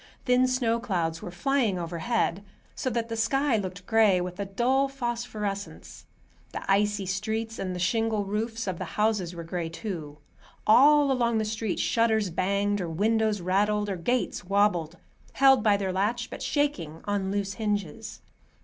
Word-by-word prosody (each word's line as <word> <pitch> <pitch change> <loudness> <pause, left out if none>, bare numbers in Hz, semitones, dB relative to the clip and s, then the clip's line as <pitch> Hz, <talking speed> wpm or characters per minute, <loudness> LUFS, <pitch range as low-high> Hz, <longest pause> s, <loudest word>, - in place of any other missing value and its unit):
Thin 250 0 +4
snow 240 -3 +1
clouds 170 -8 -2
were - - -6
flying 220 +2 0
overhead, 175 +3 -1 0.3
so 255 - -2
that 230 -1 -2
the 230 - -4
sky 255 +3 +1
looked 185 -2 -5
gray, 220 -5 +4
with 180 +1 -5
a 200 - -1
dull 250 +7 +1
phosphorescence. 230 -6 -5 0.5
The - - -5
icy 205 0 +2
streets 220 +4 -3
and 185 -1 -3
the - - -5
shingle 220 +2 0
roofs 225 +3 -3
of 185 -4 -3
the - - -7
houses 210 -5 +1
were 170 - -6
gray, 165 0 -4
too. 165 -5 -6 0.5
All 285 +5 +6
along 235 -3 +1
the 220 - 0
street, 215 -2 -2
shutters 220 -4 +2
banged 200 +3 0
or 175 - -3
windows 215 +3 +1
rattled, 205 +3 +1
or - - -1
gates 240 +8 -1
wobbled, 180 -4 +1 0.4
held 270 -2 +5
by 210 -1 +4
their 190 -2 -2
latch 225 +5 -1
but - - -7
shaking 185 - -1
on 200 -2 -1
loose 200 0 -2
hinges. 205 -7 -3
210 Hz, 160 wpm, -27 LUFS, 185-230 Hz, 0.5 s, All